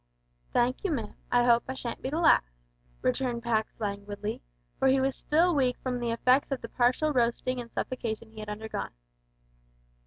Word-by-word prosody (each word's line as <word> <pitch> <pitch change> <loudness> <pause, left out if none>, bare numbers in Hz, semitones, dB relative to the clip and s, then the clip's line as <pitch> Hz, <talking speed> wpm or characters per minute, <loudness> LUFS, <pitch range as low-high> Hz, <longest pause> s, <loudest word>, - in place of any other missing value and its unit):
"Thank 245 +2 +1
you, 395 - 0
ma'am. 230 -8 -3 0.2
I 245 0 +5
hope 235 -1 +4
I 260 - -4
shan't 240 -2 -5
be 260 - -2
the 300 - -2
last," 330 - +5 0.6
returned 240 - 0
Pax 220 -2 -1
languidly, 205 0 -4 0.4
for 265 - +3
he 265 0 +5
was 265 0 +1
still 340 +4 +2
weak 255 -4 +2
from 250 -1 -1
the 240 -1 -1
effects 255 +5 +3
of 270 - -1
the - - -7
partial 255 +5 +2
roasting 245 0 +1
and 235 -1 -11
suffocation 230 -3 -4
he 220 - -11
had 215 -1 -6
undergone. 215 - -5
245 Hz, 180 wpm, -29 LUFS, 225-260 Hz, 0.6 s, I